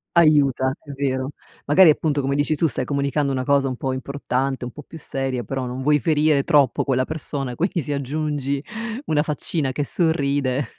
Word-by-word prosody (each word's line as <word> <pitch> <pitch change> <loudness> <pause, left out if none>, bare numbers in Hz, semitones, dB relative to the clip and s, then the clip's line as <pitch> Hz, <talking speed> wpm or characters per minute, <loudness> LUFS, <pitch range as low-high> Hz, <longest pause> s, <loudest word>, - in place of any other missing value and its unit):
Aiuta, 140 -5 +4
è 145 - -11
vero. 135 -1 -1 0.4
Magari 160 +3 +7
appunto, 150 -1 0
come 135 +1 -1
dici 145 +2 +1
tu, 165 - +2
stai 130 -2 -3
comunicando 140 +1 0
una 130 -1 -1
cosa 140 0 +3
un 130 - -3
po' 130 +1 -2
importante, 135 -1 -2
un 125 - -6
po' 150 - -10
più 160 - -12
seria, 135 -4 -3
però 135 +3 -3
non 125 +2 -5
vuoi 150 +1 +3
ferire 150 -2 +3
troppo 140 -4 +3
quella 130 -2 +1
persona, 140 -4 -4
quindi 175 +2 0
se 145 +1 -3
aggiungi 140 0 -2 0.4
una 150 - +2
faccina 150 -1 -2
che 145 +3 -2
sorride 140 -6 0
140 Hz, 185 wpm, -22 LUFS, 130-150 Hz, 0.4 s, Magari